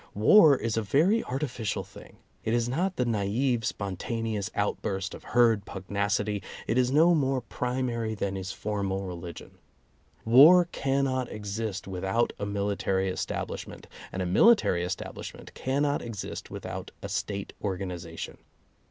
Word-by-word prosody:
War 140 - +7
is 115 -2 -2
a - - +2
very 165 - +3
artificial 125 -5 -2
thing. - - -14 0.3
It 110 - +1
is 120 -1 +1
not 175 +9 -1
the 125 - 0
naive 115 +3 0
spontaneous 105 +2 -3
outburst 95 -1 -2
of - - -10
herd 115 -4 +3
pugnacity; 100 +1 -2 0.2
it - - 0
is 125 -1 +3
no 160 +6 +5
more 135 -4 +2
primary 120 -2 -2
than 100 -1 -2
is 95 0 -4
formal 100 -2 -2
religion. 85 -1 -8 0.7
War 150 +10 +8
cannot 135 -2 0
exist 105 -1 -4
with 95 -1 -5
out 115 +5 +1
a 100 - -2
military 100 -1 0
establishment, 95 - -4 0.3
and 95 - -2
a - - -2
military 95 - +4
estab 90 +2 -4
lishment - - -9
cannot 140 +2 0
exist 115 -5 -6
without - - -6
a - - -3
State 100 -1 -3
organization. 90 -4 -5
110 Hz, 140 wpm, -28 LUFS, 100-130 Hz, 0.7 s, War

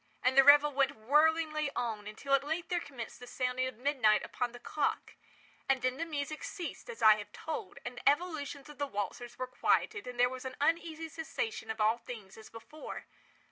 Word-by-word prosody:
And 255 +1 +3
the 270 - +9
revel 290 +1 +8
went 275 0 +2
whirlingly 305 +5 +2
on, 220 -4 -2
until 245 +6 -3
at 275 0 +5
length 325 +3 -3
there 355 -1 +1
commenced 260 -8 -8
the 245 - -10
sounding 255 0 -1
of 255 - -6
midnight 250 -5 +3
upon 245 -1 -2
the 245 - -10
clock. 285 +4 -2 0.6
And 265 -2 +2
then 255 0 +1
the 330 - -3
music 300 -1 -4
ceased, 365 +5 -6
as 470 - -6
I 215 -1 +8
have 210 - -8
told; 375 +6 -6
and 245 0 -6
the 260 - +4
evolutions 290 -3 -2
of 295 -1 -13
the 285 - 0
waltzers 235 +4 -4
were 255 - -2
quieted; 415 - +1
and 250 -1 -7
there 245 - +6
was 255 0 -6
an 260 -1 -5
uneasy 325 +1 0
cessation 445 - -4
of 220 0 -4
all 220 +2 +3
things 215 -5 -9
as 220 - -12
before. 260 +7 -9
275 Hz, 205 wpm, -32 LUFS, 245-310 Hz, 0.6 s, the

